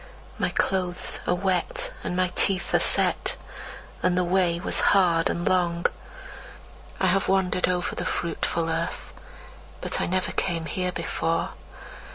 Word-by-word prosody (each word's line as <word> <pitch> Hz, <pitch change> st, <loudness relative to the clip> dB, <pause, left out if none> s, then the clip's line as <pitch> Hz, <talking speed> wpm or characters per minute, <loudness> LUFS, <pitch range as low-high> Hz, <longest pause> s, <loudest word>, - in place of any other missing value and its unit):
My -, -, +1 dB
clothes 180 Hz, -2 st, -1 dB
are 180 Hz, -, +3 dB
wet, 185 Hz, -1 st, -1 dB
and 180 Hz, -, -2 dB
my 185 Hz, -1 st, +1 dB
teeth 195 Hz, 0 st, +2 dB
are -, -, +5 dB
set, -, -, +2 dB, 0.6 s
And 180 Hz, 0 st, +2 dB
the 180 Hz, -, +3 dB
way 175 Hz, -1 st, +2 dB
was 185 Hz, -, +1 dB
hard 175 Hz, -4 st, +4 dB
and 170 Hz, -, -2 dB
long. 175 Hz, -2 st, +1 dB, 1.1 s
I -, -, +2 dB
have 185 Hz, +1 st, +2 dB
wandered 190 Hz, -1 st, +2 dB
over 180 Hz, -1 st, -1 dB
the -, -, -3 dB
fruitful 170 Hz, -1 st, -1 dB
earth, 165 Hz, +1 st, -3 dB, 0.7 s
But -, -, -2 dB
I -, -, 0 dB
never 185 Hz, +1 st, 0 dB
came 170 Hz, -3 st, -1 dB
here 180 Hz, +2 st, -1 dB
before. 165 Hz, -1 st, -1 dB
180 Hz, 145 wpm, -25 LUFS, 170-185 Hz, 1.1 s, are